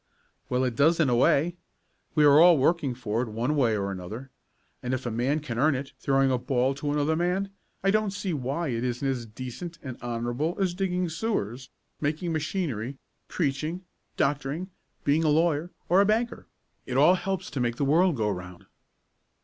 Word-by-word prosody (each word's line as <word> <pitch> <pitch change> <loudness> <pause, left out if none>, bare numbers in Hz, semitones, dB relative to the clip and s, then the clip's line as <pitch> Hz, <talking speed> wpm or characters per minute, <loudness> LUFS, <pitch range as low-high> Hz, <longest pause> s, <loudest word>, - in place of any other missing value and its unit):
"Well, 125 +1 +1
it 125 -2 -1
does 160 +6 +4
in 155 -5 +3
a 120 - +3
way. 155 +7 +3 0.6
We 150 -2 +5
are 145 +1 +7
all 170 0 +8
working 140 -2 +1
for 115 -2 -2
it, 125 - -2
one 120 +7 -1
way 120 -7 +2
or 100 -1 -2
another, 105 +8 -7 0.5
and 125 +1 -1
if 130 - -6
a 120 - -2
man 130 +7 0
can 125 -5 -4
earn 150 +1 +4
it 135 +2 -5
throwing 135 -1 +2
a 125 - +1
ball 130 +1 +1
to 145 +1 -3
another 150 +2 +1
man, 180 +4 0 0.3
I 195 - +4
don't 215 0 +2
see 195 -2 -3
why 140 +1 -2
that 115 +1 -2
isn't 125 +2 -1
as 125 -4 -2
decent 130 +9 -7
and 130 -3 -7
honorable 120 +7 -2
as 185 -3 +1
digging 180 -1 -1
sewers, 135 - -3 0.3
making 160 +3 -1
machinery, 145 - -2 0.3
preaching, 155 +3 -2 0.3
doctoring, 145 +6 -1 0.3
being 150 +3 +2
a 155 - +3
lawyer 160 +1 +2 0.2
or 180 +3 +5
a - - +4
banker. 230 +3 0 0.4
It - - -1
all 180 - +7
helps 190 0 -3
to 145 - -3
make 120 -1 0
the 140 - 0
world 165 +4 +4
go 105 -4 0
round." 90 -2 -8
140 Hz, 190 wpm, -27 LUFS, 125-170 Hz, 0.6 s, all